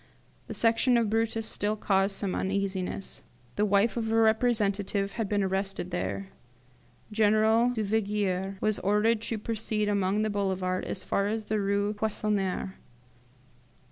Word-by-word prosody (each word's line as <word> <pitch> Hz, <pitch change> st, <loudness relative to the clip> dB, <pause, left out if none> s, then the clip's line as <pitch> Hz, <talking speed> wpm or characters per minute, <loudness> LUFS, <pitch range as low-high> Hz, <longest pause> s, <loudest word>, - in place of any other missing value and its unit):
The -, -, -5 dB
Section 235 Hz, +2 st, +3 dB
of 225 Hz, -3 st, +1 dB
Brutus 225 Hz, 0 st, 0 dB
still 210 Hz, -1 st, -1 dB
caused 195 Hz, -1 st, +1 dB
some 195 Hz, -3 st, -2 dB
uneasiness. 195 Hz, -1 st, -2 dB, 0.3 s
The 210 Hz, -, +2 dB
wife 200 Hz, +3 st, +3 dB
of 225 Hz, -1 st, -1 dB
a -, -, +2 dB
representative 215 Hz, -3 st, +2 dB
had 220 Hz, -2 st, -3 dB
been 205 Hz, -1 st, +1 dB
arrested 190 Hz, -1 st, -2 dB
there. 190 Hz, +2 st, -3 dB, 0.8 s
General 220 Hz, +2 st, +4 dB
Duvigier 205 Hz, -4 st, -1 dB
was 215 Hz, -1 st, +1 dB
ordered 210 Hz, +3 st, +2 dB
to 225 Hz, 0 st, -3 dB
proceed 215 Hz, -1 st, -2 dB
along 200 Hz, 0 st, +1 dB
the 215 Hz, -, 0 dB
Boulevard 190 Hz, -2 st, -1 dB
as 185 Hz, -, -4 dB
far 200 Hz, -, 0 dB
as 220 Hz, +1 st, -2 dB
the 215 Hz, 0 st, -1 dB
Rue 200 Hz, +1 st, 0 dB
Poissonniere. 205 Hz, -3 st, -1 dB
205 Hz, 140 wpm, -28 LUFS, 195-220 Hz, 0.8 s, General